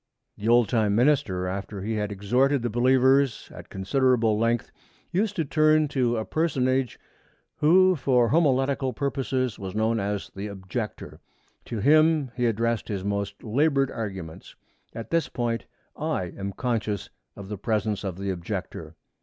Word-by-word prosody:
The 105 Hz, -, -5 dB
old 120 Hz, -1 st, +5 dB
time 105 Hz, -2 st, +1 dB
minister, 115 Hz, -8 st, +2 dB
after 100 Hz, +1 st, -5 dB
he 110 Hz, +2 st, -2 dB
had 105 Hz, -1 st, -2 dB
exhorted 125 Hz, +7 st, +1 dB
the 120 Hz, -, -1 dB
believers 130 Hz, +1 st, +3 dB
at -, -, -11 dB
considerable 115 Hz, +2 st, +2 dB
length, 115 Hz, +2 st, 0 dB, 0.4 s
used 205 Hz, +3 st, 0 dB
to 165 Hz, -5 st, -1 dB
turn 155 Hz, +1 st, +3 dB
to 125 Hz, -4 st, +1 dB
a 110 Hz, -, -2 dB
personage 130 Hz, -6 st, 0 dB, 0.6 s
who 185 Hz, +4 st, +5 dB
for 125 Hz, -5 st, +2 dB
homiletical 135 Hz, -4 st, +2 dB
purposes 130 Hz, -3 st, -2 dB
was 95 Hz, 0 st, -6 dB
known 110 Hz, +1 st, +1 dB
as 100 Hz, 0 st, -3 dB
the 100 Hz, +2 st, -5 dB
Objector. 100 Hz, +3 st, -6 dB, 0.5 s
To 115 Hz, -3 st, -4 dB
him 155 Hz, 0 st, +4 dB
he 125 Hz, -1 st, +1 dB
addressed 115 Hz, 0 st, 0 dB
his 100 Hz, -3 st, -3 dB
most 100 Hz, 0 st, -3 dB
labored 135 Hz, +3 st, +1 dB
arguments. 95 Hz, -8 st, -7 dB, 0.4 s
At 115 Hz, -, -7 dB
this 165 Hz, -1 st, +1 dB
point 115 Hz, -1 st, -2 dB, 0.3 s
I 150 Hz, -, -3 dB
am 100 Hz, 0 st, -5 dB
conscious 110 Hz, -4 st, -2 dB, 0.2 s
of 100 Hz, -1 st, -9 dB
the 105 Hz, -, -4 dB
presence 105 Hz, -1 st, -1 dB
of 95 Hz, -3 st, -4 dB
the 100 Hz, 0 st, -2 dB
Objector. 85 Hz, -3 st, -6 dB
115 Hz, 150 wpm, -25 LUFS, 100-135 Hz, 0.6 s, old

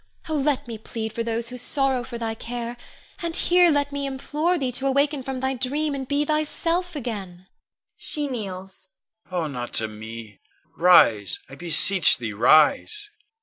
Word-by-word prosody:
Oh, 315 Hz, -, -3 dB
let 285 Hz, -2 st, 0 dB
me 225 Hz, -2 st, -7 dB
plead 220 Hz, 0 st, -6 dB
for 230 Hz, -, -3 dB
those 230 Hz, 0 st, -2 dB
who 250 Hz, 0 st, -7 dB
sorrow 265 Hz, 0 st, 0 dB
for 240 Hz, 0 st, -7 dB
thy 225 Hz, -1 st, -3 dB
care, 235 Hz, +1 st, -6 dB, 0.5 s
and 335 Hz, -1 st, -3 dB
here 355 Hz, 0 st, +4 dB
let 285 Hz, -2 st, +1 dB
me 280 Hz, 0 st, -3 dB
implore 300 Hz, +6 st, -1 dB
thee 265 Hz, -5 st, -2 dB
to 265 Hz, +2 st, -2 dB
awaken 280 Hz, +1 st, +1 dB
from 260 Hz, 0 st, -5 dB
thy 265 Hz, 0 st, 0 dB
dream 285 Hz, +4 st, -2 dB
and 270 Hz, -2 st, -5 dB
be 285 Hz, +2 st, 0 dB
thyself 330 Hz, +3 st, -1 dB
again 195 Hz, -9 st, -6 dB, 0.5 s
[she 300 Hz, -2 st, -3 dB
kneels]. 190 Hz, -6 st, -6 dB, 0.4 s
Con. 180 Hz, -1 st, -2 dB
Oh, 165 Hz, -, -1 dB
not 125 Hz, -5 st, -5 dB
to 110 Hz, -, +2 dB
me! 110 Hz, 0 st, -10 dB, 0.4 s
Rise, 115 Hz, -, +5 dB
I -, -, -11 dB
beseech 175 Hz, +3 st, +5 dB
thee, 115 Hz, -3 st, -5 dB
rise! 155 Hz, -, +3 dB
245 Hz, 170 wpm, -24 LUFS, 185-285 Hz, 0.5 s, Rise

